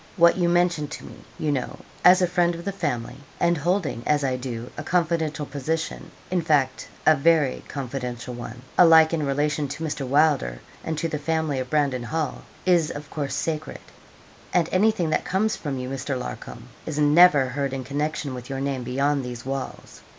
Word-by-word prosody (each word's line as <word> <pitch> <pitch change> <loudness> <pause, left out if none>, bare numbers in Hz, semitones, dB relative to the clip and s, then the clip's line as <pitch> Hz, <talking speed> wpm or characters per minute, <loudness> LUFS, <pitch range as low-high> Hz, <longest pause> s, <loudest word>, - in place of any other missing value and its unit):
What 170 -1 +6
you 175 -2 +1
mention 175 -3 +2
to 155 - -8
me, - - -10 0.2
you 155 -2 -1
know, 135 -3 -2 0.3
as 180 +1 +7
a - - +4
friend 175 -1 +1
of 170 +1 -9
the 200 - -1
family, 135 -10 -3 0.2
and 170 0 +3
holding, 170 - -1
as 150 -1 +2
I 130 -2 +1
do, 125 -2 -6
a - - -5
confidential 160 -4 0
position 150 +4 -3 0.2
in 180 -1 +2
fact, 145 -5 +1 0.2
a 155 - +7
very 150 -2 +2
confidential 125 -2 -5
one 120 0 -8 0.2
alike 160 -2 +7
in 160 -2 0
relation 145 +1 0
to 145 +4 -6
Mr. 145 -4 -3
Wylder 140 - +2 0.2
and 160 -1 -3
to 165 - -1
the 155 -2 -3
family 160 -2 -1
of 130 -1 -4
Brandon 140 -4 +1
Hall, 155 +2 -2 0.2
is 175 -4 +3
of 145 0 -8
course 145 -3 -3
sacred; 155 -1 -3 0.7
and 170 -2 +2
anything 185 -4 +2
that - - +1
comes 215 +4 0
from 140 -4 -4
you, 125 0 -4
Mr. 135 0 -3
Larcom, 125 - -7 0.2
is 155 -2 -3
never 150 -2 +6
heard 140 +1 -2
in 135 -1 -4
connection 145 +1 -2
with 125 0 -8
your 135 -1 -3
name 135 -1 -2
beyond 135 +3 0
these 125 -1 -7
walls. 135 0 -6
150 Hz, 185 wpm, -24 LUFS, 135-165 Hz, 0.7 s, as